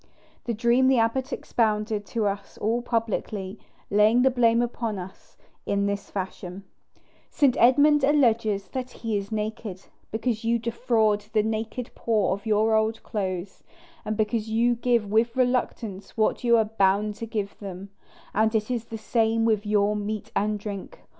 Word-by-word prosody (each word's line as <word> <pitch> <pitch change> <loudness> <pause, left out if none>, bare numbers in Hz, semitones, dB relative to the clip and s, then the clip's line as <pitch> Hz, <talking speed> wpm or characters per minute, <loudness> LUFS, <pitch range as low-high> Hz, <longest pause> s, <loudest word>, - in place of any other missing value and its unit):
This 235 - -2
dream 240 +3 +3
the 265 -1 +4
abbot 235 +4 +1
expounded 210 -2 -1
to 225 -3 -1
us 200 0 -3
all 230 +3 0
publicly, 220 -4 -2 0.3
laying 215 +4 +5
the 265 - +4
blame 235 -1 +3
upon 230 -3 -3
us, 185 +1 -10 0.3
in 200 0 0
this 200 0 -3
fashion: 190 -1 -6 0.7
"St. 275 -4 +3
Edmund 290 +4 +5
alleges 230 -8 +2
that 255 -1 -4
he 225 -3 -4
is 200 0 -3
naked, 215 -3 -4 0.3
because 225 0 -2
you 230 +1 +2
defraud 225 -3 +1
the 215 -2 +3
naked 220 +3 -3
poor 220 -4 +1
of 200 +3 -7
your 220 +1 +3
old 220 +1 +1
clothes, 190 -2 -4 0.4
and 215 0 -3
because 220 0 -1
you 235 +2 +3
give 235 -2 +1
with 225 +3 +1
reluctance 245 -5 -1
what 220 +3 +1
you 235 -1 +5
are 220 - +3
bound 210 0 +1
to 230 - -5
give 210 -3 -3
them, 195 -1 -8 0.4
and 220 +2 +2
it 215 +2 0
is 235 -2 -2
the 225 - -7
same 225 0 +1
with 215 -2 +1
your 210 0 +2
meat 210 0 -4
and 210 +1 +1
drink. 200 -2 -7
220 Hz, 160 wpm, -25 LUFS, 205-235 Hz, 0.7 s, laying